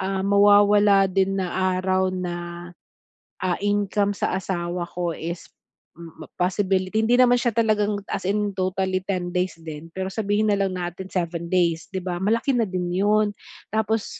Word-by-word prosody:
ah, 190 0 -2
mawawala 205 0 +5
din 195 +1 +1
na 185 0 0
araw 185 0 +1
na, 175 -1 -5 0.7
ah, 185 -1 +1
income 205 0 +1
sa - - -1
asawa 175 -2 -3
ko 175 -1 -3
is 170 +2 -6 0.5
m 165 -1 -11
possibility 190 +3 +1
hindi 235 +2 +3
naman 245 -1 +6
siya 240 -1 +1
talagang 210 -2 +1
as - - -3
in 205 +1 0
totally 185 0 -1
10 180 -3 -2
days 180 -2 -1
din, 155 0 -8
pero 190 0 -2
sabihin 210 0 0
na 200 - +2
lang 195 -1 0
natin 180 +1 -5
7 170 -2 -2
days, 170 -3 +1
'di 190 - -2
ba, 175 -1 -3
malaki 230 +5 +1
na 230 - +2
din 180 -1 -2
'yon. 210 +2 +2 0.4
Tapos, 220 0 -1
190 Hz, 160 wpm, -23 LUFS, 180-205 Hz, 0.7 s, naman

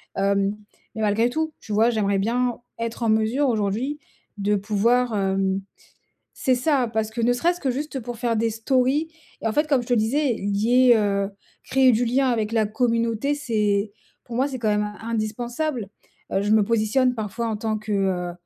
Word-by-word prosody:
Hem, 200 +1 +1 0.4
mais 220 - -4
malgré 215 +3 +2
tout, 315 +4 -2
tu 215 - -7
vois, 225 +3 +4
j'aimerais 205 -4 +1
bien 240 +3 0 0.2
être 230 +1 -4
en 230 - +2
mesure 220 +6 +2
aujourd'hui 230 +7 -1 0.4
de 205 +1 +1
pouvoir, 225 +4 +1
hem 195 -1 0 0.7
c'est 260 - +1
ça! 260 -1 +1
Parce 220 -1 -1
que 220 - -5
ne 235 +1 +3
serait-ce 345 +8 0
que 270 - 0
juste 280 +2 -3
pour 240 0 -7
faire 235 -1 0
des 230 +1 +1
stories 260 +7 +1 0.3
et - - -4
en 220 - +1
fait, 300 +6 +1
comme 275 -4 +2
je 240 - -10
te 245 - +3
disais, 245 +4 +1
lier, 225 +5 +3
heu 200 -2 0 0.3
créer 265 -1 +4
du 235 +2 +2
lien 260 +3 +2
avec 225 -3 0
la 220 -2 +2
communauté, 230 +3 0
c'est 210 -7 0 0.3
pour 235 -1 -7
moi, 265 - +2
c'est 260 - -5
quand 225 -2 -1
même 210 0 0
indispensable. 230 +3 -3 0.4
Heu, 195 - +1
je 205 - -1
me 215 -1 +5
positionne 230 +4 +2
parfois 225 +1 -3
en 220 - -2
tant 215 0 -2
que, 215 0 -5
heu, 185 -3 0
225 Hz, 190 wpm, -23 LUFS, 210-250 Hz, 0.7 s, me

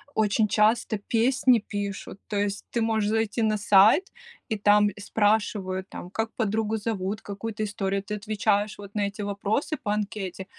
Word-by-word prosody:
очень 215 0 +2
часто 215 +1 +2
песни 240 +4 +2
пишут. 200 -2 -5
То 210 - -3
есть, 205 0 -2
ты 235 - 0
можешь 220 -2 +1
зайти 225 +1 0
на 215 -1 +2
сайт, 205 - +5 0.4
и 220 - -1
там 205 0 +4
спрашивают, 205 -3 0
там, 175 - -8
как 225 +3 -2
подругу 220 0 0
зовут, 205 -2 -3
какую-то 210 +2 -5
историю. 200 -1 -2
Ты 210 +2 -5
отвечаешь, 210 0 0
вот, 200 0 -11
на 205 -1 +1
эти 200 +1 -7
вопросы 205 +9 -1
по 205 - -1
анкете, 200 -3 -4
210 Hz, 160 wpm, -26 LUFS, 200-220 Hz, 0.4 s, сайт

